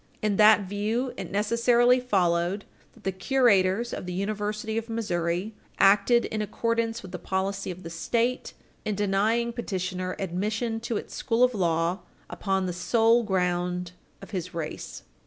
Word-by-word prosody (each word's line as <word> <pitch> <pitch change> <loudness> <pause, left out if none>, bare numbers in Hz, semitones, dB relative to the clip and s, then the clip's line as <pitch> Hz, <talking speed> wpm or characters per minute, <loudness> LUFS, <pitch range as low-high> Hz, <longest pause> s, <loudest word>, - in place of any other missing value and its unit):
In 210 -2 +1
that 215 0 +7
view, 210 +6 -2
it - - -6
necessarily 235 +4 +3
followed 185 -4 +1 0.3
that 225 - -20
the 190 - 0
curators 205 0 +2
of - - -5
the 180 - -4
University 210 +3 -2
of 225 +1 -3
Missouri 185 -3 -2 0.2
acted 205 +5 +5
in 215 - -3
accordance 230 +2 -1
with 185 - -9
the 180 - -6
policy 190 +2 -2
of 185 0 -7
the 165 - -6
State 235 +9 -1 0.3
in 210 - -2
denying 210 +4 +1
petitioner 185 -5 -3
admission 210 +5 -2
to 230 -1 -2
its - - -7
School 235 -1 +1
of 250 0 +4
Law 170 -1 0 0.3
upon 190 -1 -1
the 180 - -2
sole 225 +6 +3
ground 180 -3 -1 0.3
of - - -11
his 180 -2 -4
race. 155 - -6
205 Hz, 155 wpm, -26 LUFS, 185-230 Hz, 0.3 s, that